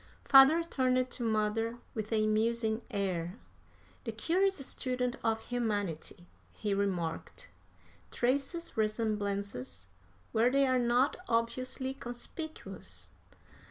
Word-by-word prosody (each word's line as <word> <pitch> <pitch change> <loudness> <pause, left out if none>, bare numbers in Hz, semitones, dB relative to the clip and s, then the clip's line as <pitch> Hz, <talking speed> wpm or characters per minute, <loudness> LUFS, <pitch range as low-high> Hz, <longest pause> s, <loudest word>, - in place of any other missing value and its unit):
Father 275 +5 +8
turned 255 -5 +1
to - - -5
mother 225 +1 0 0.2
with 215 -1 -4
a 215 -1 +3
musing 220 +1 +1
air. 190 -4 -2 0.7
"The 230 - -3
curious 370 - +2
student 250 -1 -1
of 225 0 +1
humanity," 205 -8 -2 0.3
he 210 -2 -2
remarked, 185 -5 -2 0.6
"traces 275 - -1
resemblances 200 - -1 0.4
where 230 +2 +4
they 275 +1 +4
are 255 -1 +3
not 245 +3 +3
obviously 255 +3 -1
conspicuous. 270 +5 -6
230 Hz, 100 wpm, -32 LUFS, 210-255 Hz, 0.7 s, Father